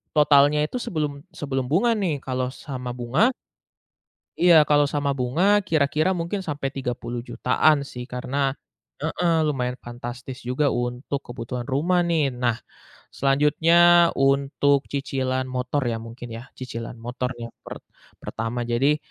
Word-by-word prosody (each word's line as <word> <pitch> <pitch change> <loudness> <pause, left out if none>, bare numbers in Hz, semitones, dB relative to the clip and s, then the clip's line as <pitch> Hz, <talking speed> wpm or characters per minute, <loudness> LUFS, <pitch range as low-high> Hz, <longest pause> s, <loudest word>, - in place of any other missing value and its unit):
totalnya 150 0 +5
itu 250 - -4
sebelum 150 -8 -3 0.2
sebelum 135 -3 -2
bunga 200 +11 +3
nih. 185 -9 -1
Kalau 130 -1 -2
sama 125 -3 -6
bunga 125 - +2 1.1
Iya, 170 -4 +6
kalau 145 -1 +5
sama 140 -1 -1
bunga 180 +11 +2
kira-kira 155 +2 +1
mungkin 180 +3 -3
sampai 145 -4 -3
Rp30.000.000-an 125 +3 0
sih. 125 -3 -7
Karena 135 +2 -2 0.5
heeh, 165 +2 +1
lumayan 125 -3 -1
fantastis 120 +2 -8
juga 130 +4 +1
untuk 125 +3 -2
kebutuhan 120 0 -5
rumah 155 +7 +1
nih. 160 -4 +2
Nah 120 -2 0 0.6
selanjutnya, 165 +5 +5
untuk 140 +1 +2
cicilan 130 -2 -2
motor 130 +2 -2
ya, 115 -2 -2
mungkin 115 +1 -9
ya, 120 +3 -8
cicilan 115 -2 -6
motor 125 +2 -4
nih 120 - -7
yang - - -60
per - - -9 0.4
pertama. 115 +2 -4
Jadi, 135 +6 +2
135 Hz, 130 wpm, -24 LUFS, 125-150 Hz, 1.1 s, Iya